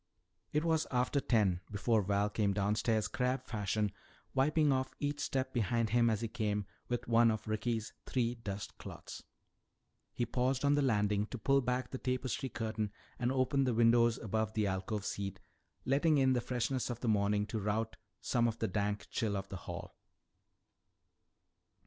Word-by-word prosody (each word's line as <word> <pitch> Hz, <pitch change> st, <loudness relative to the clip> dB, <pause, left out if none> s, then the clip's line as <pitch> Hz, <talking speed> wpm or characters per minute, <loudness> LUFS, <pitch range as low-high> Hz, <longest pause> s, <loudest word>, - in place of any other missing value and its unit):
It 150 Hz, +2 st, +1 dB
was 160 Hz, -1 st, +2 dB
after 125 Hz, +2 st, +1 dB
ten 100 Hz, -9 st, +2 dB
before 110 Hz, +2 st, +2 dB
Val 100 Hz, +1 st, +1 dB
came 105 Hz, -1 st, +1 dB
downstairs 105 Hz, +2 st, +1 dB
crab 125 Hz, 0 st, -1 dB
fashion, 105 Hz, -2 st, -1 dB, 0.4 s
wiping 150 Hz, +2 st, +3 dB
off 130 Hz, 0 st, 0 dB
each 145 Hz, 0 st, -1 dB
step 130 Hz, -2 st, -1 dB
behind 115 Hz, -1 st, +1 dB
him 120 Hz, 0 st, +4 dB
as 110 Hz, -1 st, 0 dB
he 115 Hz, -, -1 dB
came 105 Hz, -2 st, -1 dB, 0.2 s
with 120 Hz, -1 st, -2 dB
one 115 Hz, 0 st, +5 dB
of 110 Hz, -1 st, -2 dB
Ricky's 110 Hz, +1 st, -1 dB
three 120 Hz, -2 st, +1 dB
dust 105 Hz, -4 st, -6 dB
cloths. -, -, -8 dB, 0.9 s
He 120 Hz, +3 st, -1 dB
paused 125 Hz, +3 st, 0 dB
on 140 Hz, -, +5 dB
the 145 Hz, -, +3 dB
landing 105 Hz, -5 st, +2 dB
to 125 Hz, -, -6 dB
pull 135 Hz, +5 st, +3 dB
back 125 Hz, +1 st, -1 dB
the 130 Hz, -, -4 dB
tapestry 130 Hz, +1 st, -2 dB
curtain 110 Hz, -3 st, -2 dB, 0.3 s
and 125 Hz, 0 st, +1 dB
open 135 Hz, +1 st, +2 dB
the 125 Hz, -3 st, +1 dB
windows 115 Hz, 0 st, +5 dB
above 110 Hz, 0 st, -1 dB
the 110 Hz, -1 st, +2 dB
alcove 95 Hz, +1 st, -2 dB
seat, 100 Hz, -1 st, -3 dB, 0.5 s
letting 145 Hz, +4 st, +3 dB
in 130 Hz, -1 st, +4 dB
the 125 Hz, -, +1 dB
freshness 125 Hz, +1 st, -1 dB
of 120 Hz, -1 st, -4 dB
the 125 Hz, -, -2 dB
morning 105 Hz, -1 st, +2 dB
to 110 Hz, +1 st, -3 dB
rout 105 Hz, +2 st, -1 dB, 0.3 s
some 120 Hz, -2 st, +2 dB
of 115 Hz, -1 st, -2 dB
the 110 Hz, -, 0 dB
dank 105 Hz, +1 st, -1 dB
chill 105 Hz, -3 st, 0 dB
of 95 Hz, 0 st, -5 dB
the 95 Hz, -, -5 dB
hall. -, -, -6 dB
115 Hz, 170 wpm, -34 LUFS, 105-130 Hz, 0.9 s, one